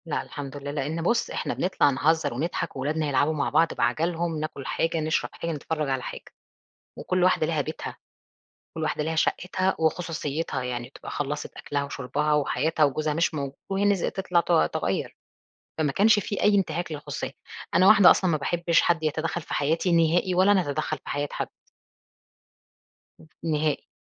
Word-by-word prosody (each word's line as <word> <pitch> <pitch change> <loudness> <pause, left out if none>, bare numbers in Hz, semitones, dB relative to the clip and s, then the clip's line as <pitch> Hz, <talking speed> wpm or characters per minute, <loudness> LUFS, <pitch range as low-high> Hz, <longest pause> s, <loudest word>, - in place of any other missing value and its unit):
لأ 160 - -1
الحمد 145 -1 -7
لله، 140 0 -5
لإن 150 +3 -2
بُصّ، 235 +8 +1
إحنا - - -2
بنطلَع 185 -5 +2
نهزّر 145 +1 +1
ونضحَك 150 +8 -3
وأولادنا 150 +3 -1
يلعبوا 145 +3 +2
مع 150 -2 -1
بعض 160 +2 +3
بعجَلهم، 165 +6 0
ناكُل 150 -3 -5
حاجة، 165 +2 0
نشرَب 155 0 0
حاجة، 165 - -4
نتفرّج 155 -1 -3
على 130 -1 -1
حاجة - - -7 0.8
وكلّ 185 -1 0
واحدة 180 -3 +3
ليها 160 -2 0
بيتها، 155 +3 -5 0.8
كلّ 160 - -2
وحدة 155 - -1
ليها 160 +1 -2
شقّتها 185 +3 0
وخصوصيتها، 160 -4 -1
يعني 120 -1 -4
تبقى - - -10
خلّصِت 145 +1 -4
أكْلها 145 -1 -2
وشُربها 140 +2 -1
وحياتها 150 +2 +1
وجوزها 150 +2 -1
مش 165 +2 +1
موجود 140 -2 -4 0.2
وهي 195 +1 +1
نز 200 -3 +2
تطلَع 185 -2 +1
ت - - -4 0.2
تغيّر. - - -2 0.6
فما 150 -3 +2
كانش 215 +6 +4
في 205 0 -3
أي 210 0 +4
إنتهاك 175 -3 -1
للخصوصية، 150 -1 -5 0.4
أنا 185 - +6
واحدة 205 -3 +8
أصلًا 185 -2 +2
ما 155 - +2
باحبش 170 +3 +2
حد 170 -2 +1
يتدخّل 160 +2 -1
في - - -8
حياتي 160 +5 +1
نهائي 170 +2 +3
ولا 190 +3 +5
أنا 195 -2 +4
أتدخّل 155 +1 -2
في - - -12
حياة 145 0 -1
حد. - - -3 2.0
ن 165 - -1
نهائي، 150 -2 0
155 Hz, 170 wpm, -26 LUFS, 145-170 Hz, 2.0 s, واحدة